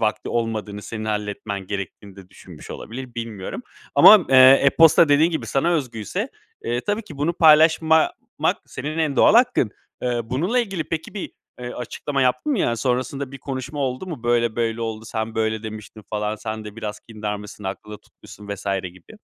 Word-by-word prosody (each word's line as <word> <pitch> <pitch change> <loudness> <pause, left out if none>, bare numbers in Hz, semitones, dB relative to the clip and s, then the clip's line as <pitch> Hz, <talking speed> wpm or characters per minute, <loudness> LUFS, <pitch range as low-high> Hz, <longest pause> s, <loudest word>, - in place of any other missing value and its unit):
vakti 110 -1 -1
olmadığını, 110 -3 -3
senin 110 0 -6
halletmen 105 -2 -4
gerektiğini 100 0 -6
de 95 -1 -14
düşünmüş 90 -4 -13
olabilir, 125 +1 -8
bilmiyorum 115 - -6 0.3
ama, 210 -5 +8
eee, 135 - +4 0.3
e-posta 160 +3 +6
dediğin 150 +4 +4
gibi 160 - -3
sana 140 +6 +1
özgüyse, 115 - -3 0.4
eee, 120 +1 -1
tabii 205 - -2
ki 155 -8 -12
bunu 155 +4 +1
paylaşmamak 160 0 +5 0.5
senin 155 +2 -5
en 155 -4 0
doğal - - +6
hakkın. 245 - +4 0.3
Iıı, 120 -2 -2
bununla 175 - 0
ilgili 195 -9 -2
peki 160 +3 -4
bir, 200 - -5 0.3
ııı, 120 0 -6
açıklama 135 +3 -3
yaptın 130 - +1
mı? 255 - 0
Yani, 120 -9 +1
sonrasında 130 +3 -2
bir 135 - -8
konuşma 135 +2 -6
oldu 130 +6 -2
mu? 155 -10 -7
Böyle 120 -1 +1
böyle 115 -1 -1
oldu, 110 -1 -4
sen 110 0 -4
böyle 110 0 -1
demiştin 110 0 -9
falan, 105 0 -2
sen 110 0 -6
de 105 0 -10
biraz 105 -2 -6
kindarmışsın, 105 -2 -7
aklında 105 +2 -6
tutmuşsun 105 0 -15
vs. 100 -2 -6 0.2
gibi. 90 -1 -11
120 Hz, 170 wpm, -22 LUFS, 105-150 Hz, 0.5 s, ama